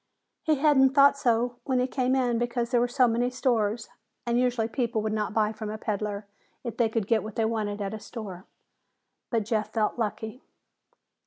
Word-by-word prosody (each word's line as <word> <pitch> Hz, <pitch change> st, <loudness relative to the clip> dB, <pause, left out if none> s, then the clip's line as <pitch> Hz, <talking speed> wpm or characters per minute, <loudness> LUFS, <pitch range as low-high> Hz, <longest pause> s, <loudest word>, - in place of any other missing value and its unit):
He 315 Hz, -, +2 dB
hadn't 270 Hz, -2 st, +4 dB
thought 280 Hz, 0 st, +7 dB
so 240 Hz, -2 st, +1 dB
when 260 Hz, -2 st, +1 dB
he 250 Hz, -, +2 dB
came 260 Hz, 0 st, 0 dB
in 245 Hz, -3 st, +1 dB
because 240 Hz, 0 st, -1 dB
there 240 Hz, -, +3 dB
were 245 Hz, -, +1 dB, 0.2 s
many 240 Hz, +2 st, +1 dB
stores, 235 Hz, -4 st, 0 dB, 0.4 s
and 240 Hz, 0 st, +1 dB
usually 245 Hz, -3 st, +1 dB
people 230 Hz, -2 st, -1 dB
would 215 Hz, 0 st, -1 dB
not 215 Hz, 0 st, -1 dB
buy 215 Hz, 0 st, +1 dB
from 215 Hz, -1 st, -6 dB
a 215 Hz, -, -4 dB
peddler 210 Hz, -1 st, -3 dB, 0.4 s
if 235 Hz, -3 st, -5 dB
they 235 Hz, -2 st, +3 dB
could 220 Hz, -2 st, -1 dB
get 220 Hz, +1 st, +2 dB
what 215 Hz, -1 st, -8 dB
they 225 Hz, -, +1 dB
wanted 210 Hz, -2 st, -2 dB
at 195 Hz, -, -4 dB
a 220 Hz, -, -5 dB
store. 195 Hz, -5 st, -8 dB, 0.8 s
But 225 Hz, -4 st, 0 dB
Jeff 215 Hz, -1 st, -1 dB
felt 220 Hz, +1 st, 0 dB
lucky. 220 Hz, +2 st, -3 dB
230 Hz, 190 wpm, -27 LUFS, 215-250 Hz, 0.8 s, thought